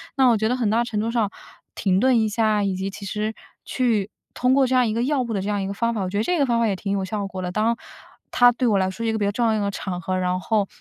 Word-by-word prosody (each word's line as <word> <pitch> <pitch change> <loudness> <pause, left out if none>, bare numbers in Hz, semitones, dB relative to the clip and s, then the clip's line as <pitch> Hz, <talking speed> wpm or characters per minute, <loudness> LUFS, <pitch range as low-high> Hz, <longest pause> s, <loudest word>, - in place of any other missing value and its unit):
那 265 -2 +4
我 230 - +4
觉 220 - 0
得 250 - +1
很 235 -5 0
大 230 +3 +2
程 215 -3 -2
度 225 +2 -1
上， 230 -4 +1 0.5
停 190 -1 +1
顿 255 0 +4
一 220 -1 +1
下， 215 -1 +1
以 195 -1 0
及 190 +1 -3
其 200 +1 -9
实 215 +2 -2 0.3
去 225 -6 0 0.2
通 250 +1 +2
过 270 -1 +4
这 255 - -1
样 250 -2 +4
一 215 - -1
个 235 +2 0
药 275 -1 +1
物 235 -2 -3
的 195 - -1
这 200 - -3
样 205 - 0
的 195 - -2
一 - - -3
个 200 - -3
方 230 +3 0
法， 215 - -2
我 185 - -2
觉 200 - -3
得 210 - +1
这 355 +6 0
个 280 - +4
方 235 -2 +1
法 230 - +3
也 200 - 0
挺 200 0 -3
有 195 -1 -1
效 200 0 -3
果 190 -1 -6
的。 180 -1 -3
当， 220 +4 +1 0.5
它 245 0 +6
对 245 +1 -1
我 210 -3 +3
来 190 0 +1
说 230 +5 -5
一 225 - +1
个 - - -1
比 210 - -1
较 200 - +1
重 235 +3 0
要 225 - +3
的 - - +1
一 - - -1
个 200 0 -1
场 180 -2 -5
合， 185 +2 -2
然 185 0 -1
后 210 0 +1
215 Hz, 365 characters per minute, -23 LUFS, 195-235 Hz, 0.5 s, 它